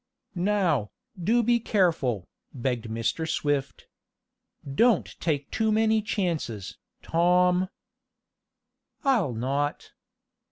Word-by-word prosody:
"Now, 175 Hz, -, +1 dB, 0.3 s
do 235 Hz, +6 st, +3 dB
be 235 Hz, +1 st, +3 dB
careful," 165 Hz, -, +1 dB, 0.3 s
begged 125 Hz, -2 st, -2 dB
Mr. 115 Hz, +8 st, -2 dB
Swift. 145 Hz, -3 st, -1 dB, 0.8 s
"Don't 220 Hz, -, +2 dB
take 145 Hz, -4 st, -1 dB
too 220 Hz, -1 st, +1 dB
many 220 Hz, 0 st, +3 dB
chances, 170 Hz, -, -3 dB, 0.2 s
Tom." 180 Hz, +2 st, +3 dB, 1.3 s
"I'll 230 Hz, -, +2 dB
not." 140 Hz, +5 st, -2 dB
170 Hz, 85 wpm, -26 LUFS, 135-210 Hz, 1.3 s, do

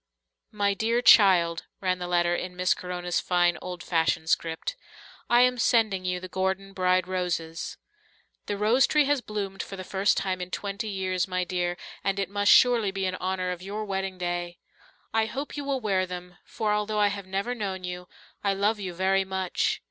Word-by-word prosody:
"My 205 Hz, -1 st, +1 dB
dear 230 Hz, +4 st, 0 dB
child," 175 Hz, -7 st, +6 dB
ran 185 Hz, -1 st, 0 dB
the 180 Hz, -, -4 dB
letter 175 Hz, -1 st, +2 dB
in 180 Hz, 0 st, -5 dB
Miss 180 Hz, 0 st, +2 dB
Corona's 180 Hz, -1 st, -3 dB
fine, 175 Hz, -1 st, +2 dB
old 180 Hz, -1 st, -6 dB
fashioned 160 Hz, -1 st, +1 dB
script. 165 Hz, -, -1 dB, 0.5 s
"I 240 Hz, +1 st, +6 dB
am 250 Hz, 0 st, +3 dB
sending 220 Hz, -6 st, +2 dB
you 180 Hz, 0 st, -1 dB
the 185 Hz, -, -7 dB
Gordon 190 Hz, +1 st, -2 dB
bride 185 Hz, -1 st, +2 dB
roses. 175 Hz, -3 st, -3 dB, 0.7 s
The 205 Hz, -, -2 dB
rose 225 Hz, +6 st, +4 dB
tree 300 Hz, -1 st, +3 dB
has 285 Hz, -1 st, +1 dB
bloomed 200 Hz, -3 st, -4 dB
for 195 Hz, -, -7 dB
the 185 Hz, -, -6 dB
first 195 Hz, +2 st, +1 dB
time 185 Hz, -1 st, -1 dB
in 180 Hz, -, -5 dB
twenty 200 Hz, +4 st, -4 dB
years, 185 Hz, -2 st, -1 dB
my 185 Hz, -1 st, -1 dB
dear, 175 Hz, -1 st, -2 dB, 0.3 s
and 195 Hz, 0 st, 0 dB
it 195 Hz, -1 st, -2 dB
must 205 Hz, 0 st, +3 dB
surely 240 Hz, -5 st, +6 dB
be 195 Hz, 0 st, -2 dB
in 185 Hz, -, -1 dB
honour 185 Hz, 0 st, -2 dB
of 180 Hz, -1 st, -5 dB
your 205 Hz, +3 st, -4 dB
wedding 195 Hz, -1 st, -3 dB
day. 175 Hz, -1 st, -3 dB, 0.6 s
I 220 Hz, 0 st, +2 dB
hope 275 Hz, +6 st, -5 dB
you 290 Hz, -, -4 dB
will 275 Hz, -1 st, -1 dB
wear 195 Hz, -5 st, 0 dB
them 180 Hz, 0 st, -8 dB
for, 215 Hz, -2 st, -1 dB
although 210 Hz, 0 st, -1 dB
I 205 Hz, -1 st, +4 dB
have 200 Hz, -1 st, -6 dB
never 195 Hz, +6 st, -2 dB
known 195 Hz, -5 st, -4 dB
you, 180 Hz, 0 st, -6 dB, 0.4 s
I 200 Hz, -1 st, +1 dB
love 210 Hz, +2 st, +1 dB
you 185 Hz, -3 st, -5 dB
very 190 Hz, +2 st, +2 dB
much. 190 Hz, -1 st, -1 dB
190 Hz, 195 wpm, -27 LUFS, 180-205 Hz, 0.7 s, child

